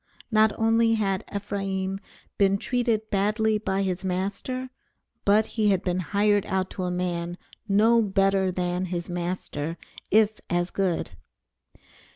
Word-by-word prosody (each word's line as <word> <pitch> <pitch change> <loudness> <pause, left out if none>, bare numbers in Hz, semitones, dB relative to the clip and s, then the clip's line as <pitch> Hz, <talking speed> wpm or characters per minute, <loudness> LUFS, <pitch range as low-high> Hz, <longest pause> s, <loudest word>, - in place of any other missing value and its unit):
Not 215 0 +5
only 225 0 +3
had 195 -2 0
Ephraim 195 -1 -3 0.4
been 195 0 +4
treated 230 -1 -1
badly 215 +2 +1
by 195 -2 -1
his 185 0 -2
master 200 +8 -3 0.5
but 210 +2 +5
he 215 -2 0
had 190 -2 +2
been 180 0 0
hired 205 +2 +2
out 190 -1 -1
to 185 - -3
a - - -1
man 175 -1 -2 0.3
no 220 +3 +4
better 195 -2 +2
than 180 0 -1
his 175 -1 -4
master, 170 -3 -3 0.3
if 215 0 +3
as 175 0 0
good. 185 -4 -1
195 Hz, 135 wpm, -26 LUFS, 185-215 Hz, 0.5 s, Not